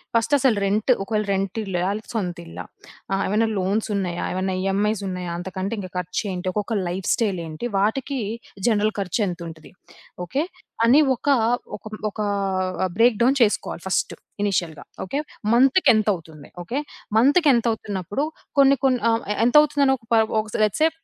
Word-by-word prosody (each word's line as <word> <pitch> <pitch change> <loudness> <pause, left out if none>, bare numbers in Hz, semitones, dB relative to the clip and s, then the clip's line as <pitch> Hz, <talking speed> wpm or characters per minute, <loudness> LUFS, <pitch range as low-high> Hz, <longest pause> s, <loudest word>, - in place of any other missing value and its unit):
ఫస్టసలు 230 0 +3
rent, 210 +5 +1
ఒకవేళ 210 +1 -1
rent 195 +2 -1
ఇల్లా, 190 -4 -3
ఆళ్ళ 210 +2 -2
సొంత 180 -5 -2
ఇల్లా, 165 - -8 0.5
ఆహ్, 195 - +1
ఏమైనా 215 +3 +2
లోన్సున్నాయా, 195 -2 -1
ఏమైనా 185 0 -1
ఈఎంఐస్సున్నాయా, 195 -2 -1
అంతకంటే 190 +4 -4 0.2
ఖర్చేంటి, 180 +1 -3
ఒక్కొక్క 210 +3 -2
లైఫ్ 180 +2 -4
స్టైలేంటి, 185 -2 -2
వాటికి 255 +7 0 0.5
జనరల్ 215 -1 +2
ఖర్చెంతుంటది. 175 -5 -3 0.5
ఓకే. 275 - -1 0.4
అని 275 +6 +6
ఒక 260 - -12 0.5
ఒక - - -32 0.3
ఒకా 210 0 -3 0.7
బ్రేక్ 230 -2 +4
డౌన్ 270 +3 +3
చేసుకోవాలి 210 -5 +1
ఫస్టు. 190 - -1 0.3
ఇనీషియల్‌గా 175 -6 -1 0.2
ఓకే. 275 +9 -2 0.4
మంత్‌కెంతవుతుంది, 210 - +2
ఓకే. 250 +11 -3 0.4
మంత్‌కెంతవుతున్నప్పుడు 235 - +2 0.3
కొన్ని, 275 0 +6
కొన్ని 255 -4 +2
ఆహ్, 225 - +1 0.2
ఎంత 245 - +1
అవుతుందని 280 -2 +2
ఒక 225 - -25
ప - - +6 0.3
ఒక - - -11 0.2
లెట్స్ 215 +8 0
సే 325 - +5
210 Hz, 130 wpm, -23 LUFS, 185-235 Hz, 0.7 s, అని